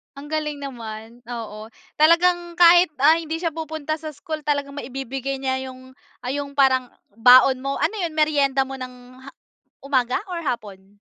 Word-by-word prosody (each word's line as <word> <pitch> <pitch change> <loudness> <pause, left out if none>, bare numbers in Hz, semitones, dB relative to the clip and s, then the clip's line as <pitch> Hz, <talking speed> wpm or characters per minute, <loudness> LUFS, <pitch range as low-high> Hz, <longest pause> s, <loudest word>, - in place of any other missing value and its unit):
Ang 290 +2 -11
galing 300 -2 -3
naman! 230 -2 -8
Oo. 220 -3 -7 0.3
Talagang 345 +2 +3
kahit 350 +1 +7 0.2
ah, 320 +3 +6
hindi 320 0 -4
siya 330 0 -2
pupunta 315 -1 -4
sa 310 -2 -8
school 310 +1 -6
talagang 285 -1 -1
maibibigay 270 +1 -5
niya 265 0 -3
yung, 260 0 -12 0.3
ah, 250 - -3
yung 280 0 -5
parang 260 -2 +3 0.2
baon 250 +4 +6
mo. 275 +1 -3
Ano 435 - -1
'yon, 335 -3 -3
meryenda 285 -3 +2
mo 265 0 -8
ng 250 0 -11
ha - - -9 0.5
umaga 260 0 +1
or 345 - -3
hapon? 205 - -6
275 Hz, 160 wpm, -22 LUFS, 255-310 Hz, 0.5 s, kahit